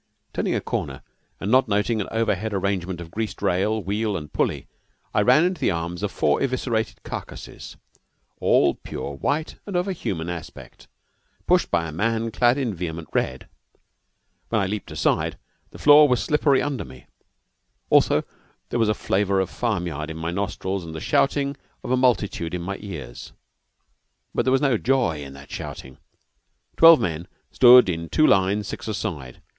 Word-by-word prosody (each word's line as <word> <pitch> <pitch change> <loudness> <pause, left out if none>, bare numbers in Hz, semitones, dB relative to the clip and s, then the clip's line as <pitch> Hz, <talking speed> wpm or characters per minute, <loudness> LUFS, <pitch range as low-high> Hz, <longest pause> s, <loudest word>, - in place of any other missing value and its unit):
Turning - - -1
a - - +1
corner, - - -4 0.4
and 100 - -3
not 130 0 +4
noting 105 +2 0
an - - -4
overhead 110 -2 -1
arrangement 95 -2 -2
of 85 -1 -9
greased 110 +2 -4
rail, 100 +3 0
wheel, 105 +1 -1
and 75 -3 -9
pulley, - - -1 0.5
I - - +3
ran 155 - +5
into 180 -1 -2
the - - +2
arms 85 +1 -3
of 105 -1 -2
four 75 -4 +1
eviscerated 120 -4 -2
carcasses, - - -8 0.6
all - - +3
pure 70 - -7
white 145 - -2
and 200 - -5
of 175 +2 +1
a 195 - -1
human 85 - -4
aspect, 85 -2 -9 0.6
pushed - - +3
by 85 -1 0
a - - -6
man 115 +6 -1
clad 120 +3 +3
in 125 -6 -1
vehement 85 -3 -5
red. 65 0 -2 1.0
When 110 - +1
I 100 - +1
leaped 105 +2 -4
aside, - - 0 0.3
the - - -13
floor 150 0 +7
was 125 -2 +1
slippery 145 -3 +2
under 145 -3 -2
me. 65 -1 -14 0.9
Also - - +4 0.5
there 120 - -1
was 110 -2 +3
a 105 - +1
flavor 100 0 0
of 95 - -1
farm 105 -7 -1
yard 75 -2 -4
in 80 - -6
my 80 +1 -3
nostrils 95 0 -3
and 80 -1 -8
the - - -4
shouting 140 - +1 0.3
of - - -4
a - - +4
multitude 105 -9 +1
in 90 - -4
my 100 +2 -4
ears. 70 - -8 1.0
But - - 0
there 130 - +2
was 135 - +3
no 135 -7 +2
joy 120 - +1
in 70 -1 -9
that 70 +1 -13
shouting. 65 0 -8 0.8
Twelve 165 -1 +8
men 85 0 -3 0.2
stood 125 -1 +8
in 85 -2 -3
two 155 - +3
lines 100 -2 +2
six - - -6
a 110 - -2
side. 75 - -6
100 Hz, 175 wpm, -23 LUFS, 85-120 Hz, 1.0 s, Twelve